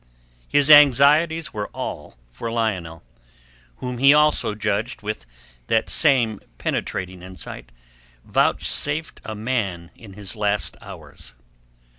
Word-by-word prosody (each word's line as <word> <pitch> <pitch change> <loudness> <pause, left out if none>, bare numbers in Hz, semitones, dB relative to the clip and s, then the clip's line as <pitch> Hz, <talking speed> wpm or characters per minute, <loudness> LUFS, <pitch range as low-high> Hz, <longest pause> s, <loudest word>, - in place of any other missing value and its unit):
His 145 +1 +3
anxieties 150 +3 +5
were 105 -1 -3
all - - -6
for 115 - -6
Lionel, 95 -8 -2 0.7
whom 125 - -6
he 140 +2 +7
also 150 -8 +2
judged 105 +2 -2
with 105 - -5 0.4
that 110 0 +1
same 125 -9 +2 0.2
penetrating 90 -1 -3
insight 90 -9 -10 0.5
vouchsafed 150 +2 -1
a 110 - -6
man 105 -7 -3
in 105 -4 -13
his 100 +2 -7
last 105 -1 -1
hours. - - -12
110 Hz, 110 wpm, -22 LUFS, 100-140 Hz, 0.7 s, he